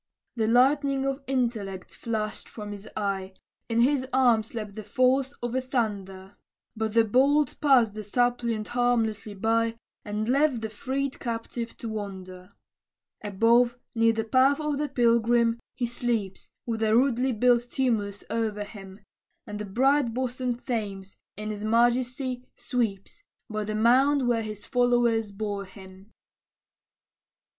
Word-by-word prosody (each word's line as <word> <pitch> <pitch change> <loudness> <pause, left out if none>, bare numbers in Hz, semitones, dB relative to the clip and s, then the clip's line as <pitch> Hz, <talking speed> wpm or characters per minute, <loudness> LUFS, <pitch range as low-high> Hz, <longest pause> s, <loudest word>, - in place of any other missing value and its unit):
The 220 -2 0
lightning 270 +3 +3
of 275 +1 -2
intellect 230 -8 -2
flashed 215 -2 -4
from 210 -2 -8
his 205 0 -8
eye, 195 -2 -2 0.4
In 230 0 +2
his 260 +1 +2
arm 245 -4 +4
slept 215 -2 -6
the 215 - -6
force 255 +5 +2
of 240 - -2
the 260 +2 0
thunder, 200 -6 -3 0.4
But 220 0 -2
the 230 - +6
bolt 275 +7 +2
passed 255 -7 +4
the 215 - -6
suppliant 235 0 0
harmlessly 225 -4 0
by, 230 +2 +1 0.3
And 210 +1 -3
left 270 -1 +2
the 220 -1 -4
freed 270 +4 -3
captive 230 -1 -5
to 230 - -6
wonder. 190 -3 -7 0.7
Above, 235 +4 +3 0.2
near 230 0 +4
the 225 0 -1
path 260 +5 +3
of 300 -2 -1
the 295 -1 -1
pilgrim, 235 -1 +3 0.2
he 250 -1 -1
sleeps, 235 -5 -3 0.2
With 225 -2 -3
a 220 0 +3
rudely 255 0 +2
built 240 +1 +2
tumulus 215 -7 -1
o'er 215 -2 -1
him; 195 -1 -11 0.4
And 210 0 -6
the 210 - -4
bright 255 +3 +2
bosomed 250 -1 -3
Thames, 200 -5 -4 0.2
in 215 0 -4
his 210 0 -6
majesty, 245 +3 +1
sweeps, 235 - -3 0.3
By 215 -1 -2
the 215 +1 -3
mound 255 +4 +4
where 235 -2 +2
his 215 -2 -7
followers 240 -4 +2
bore 200 -1 -4
him. 190 +2 -14
230 Hz, 140 wpm, -27 LUFS, 210-250 Hz, 0.7 s, the